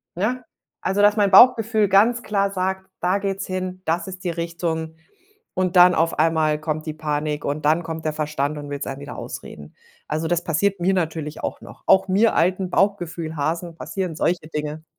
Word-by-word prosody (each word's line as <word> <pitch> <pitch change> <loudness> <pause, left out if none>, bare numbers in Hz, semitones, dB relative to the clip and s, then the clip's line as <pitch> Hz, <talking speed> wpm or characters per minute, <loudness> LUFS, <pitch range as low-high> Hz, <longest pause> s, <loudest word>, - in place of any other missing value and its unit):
ne? 245 +8 -1 0.4
Also, 195 +2 0
dass 205 +1 +5
mein 200 -1 +3
Bauchgefühl 225 -1 +6
ganz 225 +5 +4
klar 200 -3 0
sagt, 190 0 -3
da 185 +3 +1
geht's 195 -1 -3
hin, 185 0 -4
das 170 +2 -1
ist 185 0 -8
die 180 - -1
Richtung 165 -1 -3 0.6
und 185 0 0
dann 180 0 +7
auf 165 -1 0
einmal 155 -1 +2
kommt 155 0 -3
die 155 - -4
Panik 150 -1 -2
und 145 +1 -3
dann 160 +3 +3
kommt 160 -1 -6
der 155 - 0
Verstand 150 -1 -2
und 145 0 -8
will's 140 0 -4
einem 135 +1 -5
wieder 145 - -8
ausreden. - - -9 0.3
Also, 155 +2 -2
das 175 0 0
passiert 190 +4 0
mir 190 +3 +2
natürlich 160 -4 -3
auch - - -3
noch. - - -13
Auch 190 0 +5
mir 205 +4 +3
altem 185 +2 +1
Bauchgefühlhasen 170 -4 -1
passieren 165 +1 -4
solche 170 0 -1
Dinge. 150 +1 -4
170 Hz, 185 wpm, -22 LUFS, 155-190 Hz, 0.6 s, dann